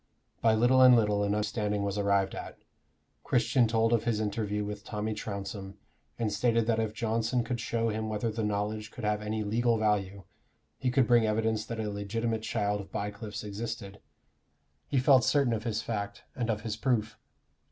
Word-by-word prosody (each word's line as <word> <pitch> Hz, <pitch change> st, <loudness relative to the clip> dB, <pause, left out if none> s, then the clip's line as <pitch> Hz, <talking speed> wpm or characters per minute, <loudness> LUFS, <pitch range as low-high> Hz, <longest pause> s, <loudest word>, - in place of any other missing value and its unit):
By 110 Hz, -1 st, +4 dB
little 125 Hz, +3 st, +4 dB
and 130 Hz, -1 st, +9 dB
little 105 Hz, -3 st, +2 dB
an 100 Hz, 0 st, +1 dB
understanding 105 Hz, -1 st, -1 dB
was 100 Hz, -1 st, -1 dB
arrived 100 Hz, -1 st, +1 dB
at. -, -, -7 dB, 0.7 s
Christian 120 Hz, 0 st, +3 dB
told 115 Hz, +1 st, +2 dB
of 115 Hz, -1 st, +1 dB
his 115 Hz, -3 st, +1 dB
interview 105 Hz, -1 st, -1 dB
with 105 Hz, 0 st, -6 dB
Tommy 110 Hz, 0 st, -3 dB
Trounsem, 100 Hz, -2 st, -6 dB, 0.4 s
and 110 Hz, -3 st, -1 dB
stated 115 Hz, +1 st, +2 dB
that 115 Hz, -1 st, +1 dB
if 110 Hz, -1 st, -2 dB
Johnson 115 Hz, +2 st, 0 dB
could 120 Hz, +1 st, -3 dB
show 115 Hz, 0 st, -1 dB
him 110 Hz, 0 st, -2 dB
whether 110 Hz, +2 st, -1 dB
the 110 Hz, +1 st, -3 dB
knowledge 105 Hz, +1 st, -2 dB
could 125 Hz, -, -10 dB
have 105 Hz, 0 st, 0 dB
any 110 Hz, +1 st, -2 dB
legal 115 Hz, +2 st, +1 dB
value, 100 Hz, -2 st, 0 dB, 0.6 s
he 130 Hz, -, 0 dB
could 125 Hz, 0 st, +3 dB
bring 120 Hz, -2 st, +4 dB
evidence 110 Hz, 0 st, 0 dB
that 115 Hz, -1 st, -5 dB
a 110 Hz, -, -2 dB
legitimate 110 Hz, +3 st, -2 dB
child 105 Hz, -2 st, -1 dB
of 95 Hz, -, -13 dB
Bycliffe's 105 Hz, 0 st, -5 dB
existed: 105 Hz, -1 st, -6 dB, 0.9 s
he 140 Hz, -, 0 dB
felt 130 Hz, 0 st, +5 dB
certain 135 Hz, +1 st, +3 dB
of 110 Hz, 0 st, -3 dB
his 110 Hz, -2 st, -1 dB
fact, 100 Hz, -2 st, -4 dB
and 120 Hz, -3 st, -2 dB
of 105 Hz, -1 st, 0 dB
his 110 Hz, -1 st, -3 dB
proof. 110 Hz, -4 st, 0 dB
110 Hz, 185 wpm, -29 LUFS, 105-115 Hz, 0.9 s, and